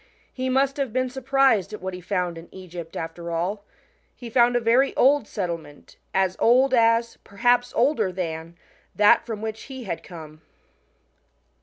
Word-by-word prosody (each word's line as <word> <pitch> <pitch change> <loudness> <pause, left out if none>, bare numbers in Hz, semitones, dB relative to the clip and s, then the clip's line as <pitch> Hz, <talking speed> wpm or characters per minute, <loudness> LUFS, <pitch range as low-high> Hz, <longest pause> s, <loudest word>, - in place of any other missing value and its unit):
He 260 0 -3
must 270 +2 +1
have 275 -5 -2
been 255 +1 -1
sur 265 +1 -7
prised 265 -7 +2
at 210 - -6
what 190 0 -5
he 180 - -7
found 180 -1 -2
in 165 +1 -11
Egypt, 175 -3 -9
after 165 +1 -6
all. 180 +5 -2 0.5
He 240 -2 -10
found 245 0 +4
a - - +4
very 240 +4 +2
old 275 -3 +3
settlement, 170 -6 -6 0.2
as 190 -1 +1
old 255 +3 +4
as 230 -1 +2
perhaps 245 +4 +1
older 250 -6 +2
than 165 -2 -5 0.4
that 210 +3 +5
from 220 -2 -5
which 220 0 -5
he 260 -2 -7
had 180 -6 -4
come. 155 -3 -11
215 Hz, 165 wpm, -24 LUFS, 180-250 Hz, 0.5 s, that